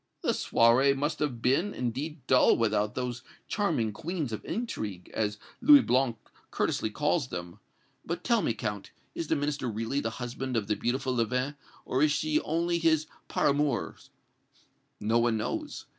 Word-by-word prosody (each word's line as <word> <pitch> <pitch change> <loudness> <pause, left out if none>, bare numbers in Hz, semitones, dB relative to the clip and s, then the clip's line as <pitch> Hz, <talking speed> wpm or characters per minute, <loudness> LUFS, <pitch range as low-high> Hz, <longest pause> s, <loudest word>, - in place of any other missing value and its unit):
"The - - +2
soirée 125 +4 +4
must 145 +3 -1
have 130 -6 -2
been, 165 +11 +2
indeed, 130 +4 -4
dull 130 -1 +5
without 105 -2 +1
those 125 0 -3 0.3
'charming 165 - 0
queens 155 - -3
of 110 - -5
intrigue,' 110 - -4
as 105 -1 -1 0.2
Louis 290 -1 +8
Blanc 125 -2 +2 0.3
courteously 110 - 0
calls 150 +4 0
them. 90 -1 -7 0.4
But 170 +2 -4
tell 235 -3 +3
me, 115 - 0
Count, 105 -2 -4 0.2
is 165 - -4
the 160 - +2
Minister 145 -3 -1
really 115 +5 -2
the 115 - -1
husband 125 0 -3
of 110 - 0
the 105 +1 0
beautiful 130 +3 -1
Leven, 125 +4 0 0.3
or 130 - 0
is 150 0 +4
she 150 +1 +1
only 170 +2 0
his 160 -2 +3 0.2
par - - +2
amours?" 145 -3 -1 0.9
"No 110 +3 +2
one 115 -1 +2
knows. 310 - -4
130 Hz, 160 wpm, -29 LUFS, 115-155 Hz, 0.9 s, Louis